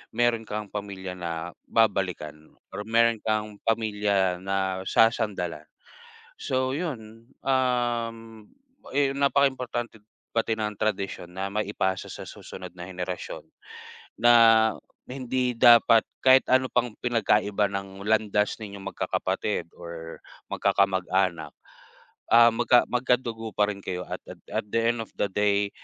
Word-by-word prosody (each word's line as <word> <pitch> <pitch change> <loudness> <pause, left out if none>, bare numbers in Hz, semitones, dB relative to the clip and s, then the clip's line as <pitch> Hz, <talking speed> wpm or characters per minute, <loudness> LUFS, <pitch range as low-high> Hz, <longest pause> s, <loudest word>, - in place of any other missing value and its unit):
mayro'n 120 -2 +1
kang 105 -1 -5
pamilya 95 -3 -6
na 85 -1 -4 0.2
babalikan 90 -8 -1 0.2
or 105 - -6
mayro'n 115 0 +3
kang 105 -1 -2
pamilya 105 -5 +1
na 95 0 -1
sasandalan. 105 -9 +1 0.7
So, 130 0 -1
'yon, 115 -8 -6
um, 120 -4 -1 0.5
eh 140 0 +2
napakaimportante 130 -5 0 0.4
pati 115 0 +1
ng 105 -1 -3
tradisyon 100 -4 -2
na 95 +2 -4
maipasa 100 -2 -1
sa - - -7
susunod - - -9
na 90 -1 -8
henerasyon 90 0 -5 0.8
na 120 +1 +6 0.7
na - - -10
hindi 125 0 -1
dapat 115 -1 +6 0.2
kahit 130 0 +6
ano 130 0 +2
pang 120 -2 0
pinagkaiba 105 -3 +2
ng 100 0 -6
landas 105 -1 +2
ninyong 100 -2 -8
magkakapatid - - -2
or 85 -1 -9 0.2
magkakamag-anak, 95 -4 +1 0.8
ah, 115 0 +8
magka 120 +1 +4
magkadugo 120 -3 0
pa 105 - +4
rin 100 -1 -7
kayo 90 0 -4
at - - -6
at - - -11
at - - -2
the 115 - 0
end 115 +1 +1
of - - -23
the - - +2
day, 100 0 +1
105 Hz, 125 wpm, -26 LUFS, 95-120 Hz, 0.8 s, ah